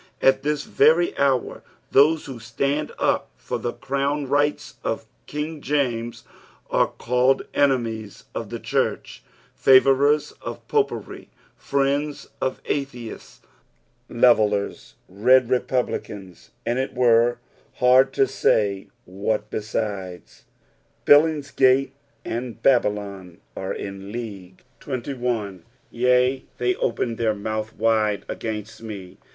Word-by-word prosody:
At 135 - +4
this 150 0 -1
very 160 +5 +3
hour, 135 -3 0 0.3
those 150 +3 +4
who 130 -3 -8
stand 140 +6 -2
up - - 0
for - - -4
the 120 - -3
crown 140 +2 -2
rights 145 +2 0
of - - -2 0.2
King 150 +1 -4
.Tesus 120 -5 -1 0.5
are - - +3
called 125 +2 +1
enemies 115 -7 0
of - - -5
the - - -4
church, - - -2 0.3
favourers 135 +3 +4
uC - - -6
Popery, 430 -1 -2 0.3
friends 140 +1 -1
of 130 - -2
Atheists, 125 -5 -5 0.7
levellers, 110 -4 +2
red 125 +6 +3
republicans, 105 -7 -2 0.2
and 120 +2 0
it 135 +1 -3
were 120 -1 +4 0.4
hard 130 +2 +5
to 135 - +3
say 100 -6 +1 0.2
what 105 +3 -3
besides. 100 -4 -5 0.6
Billingsgate 140 -3 +4 0.3
and 120 0 -4
Babylon 100 -7 0 0.2
are 95 - -4
in 100 0 -7
league. 100 -6 -8 0.2
31. 120 -7 -3
'^ - - -25 0.3
Yea, 125 +2 +2
they 125 0 +1
opened 115 0 -1
their 110 -2 +1
mouth 110 +1 -4
wide 110 -2 +1
againtt 110 -1 -5
me." 100 -5 -9
125 Hz, 110 wpm, -23 LUFS, 110-135 Hz, 0.7 s, hard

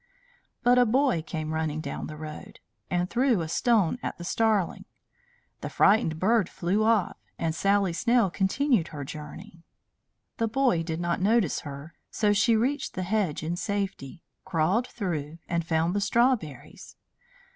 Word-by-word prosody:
But 245 +1 +5
a 245 - +5
boy 255 - +2
came 155 -1 -5
running 160 -1 -2
down 140 -3 -5
the 155 - -8
road, 155 0 -9 0.3
and 180 0 0
threw 240 -2 +2
a 160 - -3
stone 220 +3 +2
at - - -4
the 175 - -8
starling. 210 0 0 0.7
The - - -5
frightened 195 -6 +3
bird 205 +2 +2
flew 190 +5 0
off, 220 -4 +2 0.2
and 165 -1 -1
Sally 195 +2 +1
Snail 235 0 +2
continued 200 - +1
her 145 -2 -7
journey. 165 +6 -9 0.8
The 230 - +1
boy 245 -7 +2
did 165 0 -4
not 175 0 -1
notice 210 -3 +2
her, 145 +2 -9 0.2
so 210 -2 +1
she 225 +3 +3
reached 260 +6 -1
the 185 - -2
hedge 190 -6 -1
in 165 +2 -2
safety, 195 -7 -4 0.2
crawled 190 +7 +1
through, 165 -7 -4
and 170 -1 -1
found 160 +1 0
the 205 - 0
strawberries. 215 - -1
185 Hz, 155 wpm, -27 LUFS, 160-225 Hz, 0.8 s, But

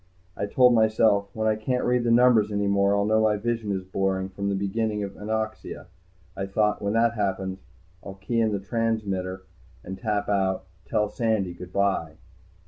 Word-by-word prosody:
I 100 - -3
told 125 +3 +5
myself: 110 -2 +3
When 110 0 0
I 110 - +3
can't 125 +4 -1
read 125 0 +1
the - - +2
numbers 115 -3 +4
any 100 0 0
more 100 0 +2
I'll 100 0 +1
know 110 +1 +3
my 110 -1 +2
vision 115 -1 -2
is 95 -1 -2
blurring 95 0 -1
from 100 +1 -3
the 100 - 0
beginning 105 +2 -1
of 100 -1 -5
anoxia. 110 -1 -4 0.5
I 95 - -4
thought: 105 +2 +1
When 100 0 -1
that 115 +1 +3
happens 95 -3 -2 0.4
I'll 95 - -8
key 110 +4 -2
in 110 -1 +2
the 100 - -1
transmitter 100 -4 -2 0.4
and 95 +1 -7
tap 105 0 -1
out, 95 -2 0 0.2
TELL 105 +2 0
SANDY 110 -7 -1
GOOD 90 +1 -10
BY. 95 -5 0
105 Hz, 185 wpm, -25 LUFS, 95-110 Hz, 0.5 s, told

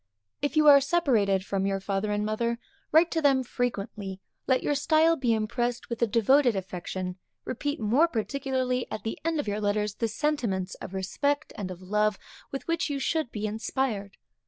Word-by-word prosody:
If 290 +2 -1
you 305 - +5
are 280 -1 +9
separated 235 - +2
from 195 -1 -1
your 195 0 0
father 195 +2 -2
and 210 0 0
mother, 235 +2 -1 0.3
write 325 +2 +5
to 325 - 0
them 270 -3 +4
frequently; 205 -6 -3 0.3
let 260 -1 +2
your - - +1
style 315 +3 +4
be 255 -6 0
impressed 235 +3 -1
with 235 - -3
a 235 - +4
devoted 240 +3 +4
affection; 185 0 -4 0.3
repeat 290 +4 -3
more 245 +10 +4
particularly 255 -1 -1
at 215 - -5
the 225 - -4
end 325 -1 0
of 290 - -2
your 205 +1 -1
letters 210 0 0
the 230 - -1
sentiments 225 -7 -1
of 190 - -7
respect 285 +10 -1
and 195 -3 -4
of 185 0 -8
love 210 +1 +1 0.3
with 275 - -5
which 335 -1 0
you 285 - -1
should 310 0 0
be 215 0 -3
inspired. 215 -1 -2
235 Hz, 180 wpm, -27 LUFS, 205-280 Hz, 0.3 s, are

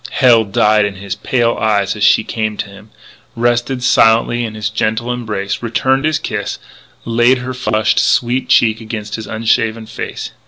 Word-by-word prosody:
Hell 120 -4 +4
died 105 +1 +2
in 100 -1 -2
his 100 0 -6
pale 120 +2 0
eyes 105 -2 +1
as 105 - -3
she 105 - +4
came 110 -2 -3
to - - -4
him, 100 +2 -15 0.5
rested 120 +2 0
silently 120 0 +3
in 110 -2 -5
his 105 -1 -3
gentle 110 +3 -1
embrace, 105 -5 -4
returned 130 +4 0
his 155 -1 +1
kiss, 105 -1 -4 0.5
laid 120 +3 +3
her 125 +1 -5
flushed, 115 -3 0
sweet 125 +1 +1
cheek 110 -3 +3
against 110 -1 -6
his 110 - -5
unshaven 115 0 0
face. 110 - -6
110 Hz, 165 wpm, -15 LUFS, 105-120 Hz, 0.5 s, Hell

